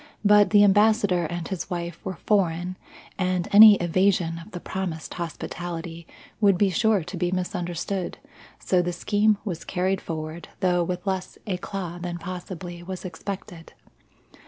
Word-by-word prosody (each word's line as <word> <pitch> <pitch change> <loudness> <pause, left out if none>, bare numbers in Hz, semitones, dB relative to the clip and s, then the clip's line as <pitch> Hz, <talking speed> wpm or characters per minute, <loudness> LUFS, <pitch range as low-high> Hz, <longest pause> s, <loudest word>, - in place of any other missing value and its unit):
But 210 0 +6
the 205 -1 +6
Ambassador 205 -3 +4
and 175 0 -5
his 190 -1 -5
wife 170 -2 -5
were 185 - -4
foreign 180 -2 0 0.4
and 185 -1 0
any 210 +1 +10
evasion 175 -1 +1
of 170 - -12
the 180 - -7
promised 175 -4 -5
hospitality 170 0 -6 0.3
would 200 -4 +4
be 195 0 +3
sure 220 -1 +2
to 175 +3 -7
be 175 0 0
misunderstood; 180 0 -3 0.4
so 180 -1 +1
the 175 0 -2
scheme 205 +4 +2
was 170 -5 -4
carried 190 +1 -1
forward 155 +1 -6
though 180 -2 +2
with 180 +2 -4
less 190 -2 -3
eclat 180 -3 -4
than 175 -1 -4
possibly 180 -1 -7
was 185 +1 -7
expected. 185 0 -7
180 Hz, 145 wpm, -25 LUFS, 175-195 Hz, 0.4 s, any